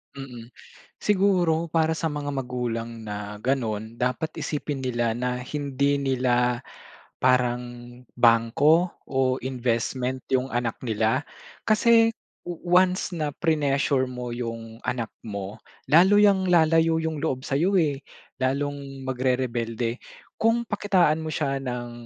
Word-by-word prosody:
Mm, 125 Hz, -4 st, -9 dB, 0.5 s
siguro 185 Hz, -5 st, +2 dB
para 160 Hz, 0 st, +1 dB
sa 160 Hz, 0 st, -1 dB
mga 145 Hz, -1 st, -3 dB
magulang 120 Hz, -3 st, -4 dB
na 105 Hz, 0 st, -6 dB
ganon 115 Hz, -4 st, -2 dB
dapat 130 Hz, +6 st, -1 dB
isipin 145 Hz, -2 st, -3 dB
nila 120 Hz, -3 st, 0 dB
na 125 Hz, +2 st, -2 dB
hindi 140 Hz, 0 st, -1 dB
nila 125 Hz, -2 st, +1 dB, 0.6 s
parang 120 Hz, -1 st, 0 dB, 0.2 s
bangko 120 Hz, +9 st, +4 dB, 0.2 s
o 130 Hz, -1 st, +1 dB
investment 130 Hz, 0 st, -2 dB
yung 130 Hz, +1 st, +1 dB
anak 120 Hz, -1 st, -2 dB
nila. 115 Hz, +1 st, +1 dB, 0.4 s
Kasi 225 Hz, +1 st, +5 dB, 0.4 s
once 180 Hz, +2 st, +1 dB
na 155 Hz, -2 st, -1 dB
prenessure 140 Hz, -3 st, +1 dB
mo 125 Hz, -1 st, -5 dB
yung 115 Hz, -1 st, -6 dB
anak 120 Hz, -2 st, -1 dB, 0.2 s
mo, 100 Hz, -2 st, -5 dB, 0.3 s
lalo 185 Hz, +6 st, +6 dB
yang 195 Hz, -3 st, +4 dB
lalayo 165 Hz, -1 st, +4 dB
yung 160 Hz, -2 st, -3 dB
loob 130 Hz, -4 st, -2 dB
sa'yo 170 Hz, +8 st, +2 dB
eh, 145 Hz, -4 st, 0 dB, 0.4 s
lalong 140 Hz, 0 st, -2 dB
magrerebelde. 125 Hz, -2 st, -1 dB, 0.3 s
Kung 230 Hz, +1 st, +1 dB
pakitaan 185 Hz, -7 st, +2 dB
mo 160 Hz, -, -4 dB
siya 135 Hz, -3 st, -1 dB
ng, 120 Hz, -2 st, -4 dB
130 Hz, 115 wpm, -25 LUFS, 120-160 Hz, 0.6 s, lalo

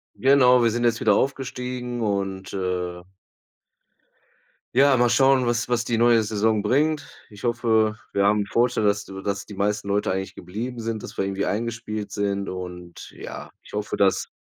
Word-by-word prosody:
Genau, 125 Hz, -2 st, +5 dB
wir 115 Hz, -, +4 dB
sind 120 Hz, +2 st, -2 dB
jetzt 115 Hz, -1 st, +2 dB
wieder 105 Hz, -2 st, +3 dB
aufgestiegen 125 Hz, -2 st, -2 dB
und, 95 Hz, -2 st, -2 dB
äh 90 Hz, -2 st, -3 dB, 1.7 s
Ja, 135 Hz, 0 st, +5 dB
mal 120 Hz, 0 st, +4 dB
schauen, 135 Hz, -2 st, +4 dB
was 120 Hz, 0 st, 0 dB
was 120 Hz, -1 st, +1 dB
die 115 Hz, -1 st, 0 dB
neue 115 Hz, -1 st, +5 dB
Saison 110 Hz, 0 st, +1 dB
bringt. 145 Hz, +5 st, +1 dB, 0.2 s
Ich 105 Hz, +1 st, -14 dB
hoffe, 110 Hz, -2 st, +2 dB, 0.2 s
wir 100 Hz, -, +1 dB
haben 105 Hz, +1 st, +3 dB
'n 100 Hz, -, -2 dB
Vorteil, 120 Hz, +1 st, +1 dB
dass 100 Hz, -1 st, +1 dB
dass 100 Hz, +1 st, -4 dB
die 105 Hz, -, -10 dB
meisten 105 Hz, +1 st, -1 dB
Leute 100 Hz, +1 st, 0 dB
eigentlich 95 Hz, +1 st, -3 dB
geblieben 115 Hz, +6 st, -6 dB
sind, 115 Hz, -1 st, -4 dB
dass -, -, -9 dB
wir 95 Hz, -, -1 dB
irgendwie 100 Hz, 0 st, -2 dB
eingespielt 110 Hz, -1 st, -3 dB
sind 100 Hz, -1 st, -2 dB
und, 90 Hz, -1 st, -8 dB
ja, -, -, -8 dB
ich -, -, -17 dB
hoffe, 105 Hz, 0 st, -3 dB
dass 100 Hz, -1 st, +2 dB
110 Hz, 170 wpm, -24 LUFS, 100-120 Hz, 1.7 s, Genau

